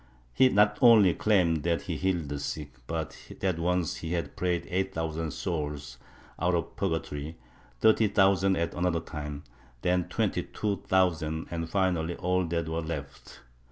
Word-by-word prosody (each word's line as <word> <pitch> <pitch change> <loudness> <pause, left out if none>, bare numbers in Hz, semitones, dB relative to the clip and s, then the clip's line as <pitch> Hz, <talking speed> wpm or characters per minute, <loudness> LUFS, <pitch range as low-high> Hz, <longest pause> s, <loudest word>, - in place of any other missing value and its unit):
He 130 - +5
not 105 0 +3
only 110 -7 +7
claimed 90 -7 +2
that 85 +1 0
he - - -3
healed 90 -6 -1
the 70 0 -3
sick 70 0 -5 0.2
but 80 -2 -3 0.2
that 95 -3 0
once 90 -1 0
he 80 +1 -4
had 85 -1 -3
prayed 90 -1 -1
eight 95 +1 -1
thousand 80 0 -2
souls 75 -8 -4 0.4
out 90 0 +2
of 85 - -3
pm 95 -4 0
gatory, 75 -1 -4 0.5
thirty 110 0 +5
thousand 95 -1 +3
at 85 -1 -1
another 85 -1 0
time, 75 -3 -6 0.4
then 90 -1 +1
twenty - - 0
two 105 -2 -3
thousand 80 -4 +1
and 85 -1 -3
finally 85 -3 0
all 90 0 0
that 85 0 -1
were 80 +1 -2
left. 75 -4 -7
85 Hz, 160 wpm, -28 LUFS, 80-95 Hz, 0.5 s, only